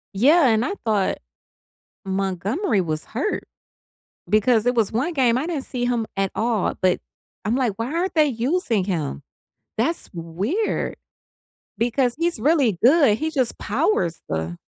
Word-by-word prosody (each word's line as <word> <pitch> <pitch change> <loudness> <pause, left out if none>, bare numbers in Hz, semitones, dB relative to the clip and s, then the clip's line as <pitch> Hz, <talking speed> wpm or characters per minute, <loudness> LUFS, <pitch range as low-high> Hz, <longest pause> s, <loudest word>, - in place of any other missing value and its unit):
Yeah, 285 - +5
and 220 -1 +3
I 265 - -1
thought 205 -4 +1 0.9
Montgomery 195 - 0
was 155 -2 -3
hurt, 290 - -2 0.8
because 215 +3 +3
it 245 - +3
was 225 -4 +2
one 270 +10 -1
game, 250 -5 +3
I 285 - -2
didn't 320 -6 -2
see 245 -1 -3
him 240 -3 0
at 195 -1 0
all, 225 -3 0
but 185 -1 +3 0.5
I'm 215 +4 0
like, 250 -6 +1
"Why 230 +1 -2
aren't 360 +2 -1
they 310 -2 +5
using 245 - 0
him?" 155 - -3 0.6
That's 290 +10 -1
weird 190 - -2 0.8
because 245 +2 +1
he's 335 -3 0
really 255 - +2
good. 270 -6 +5
He 315 +2 -1
just 260 -6 0
powers 215 - 0
the 80 +2 -3
235 Hz, 145 wpm, -22 LUFS, 195-285 Hz, 0.9 s, Yeah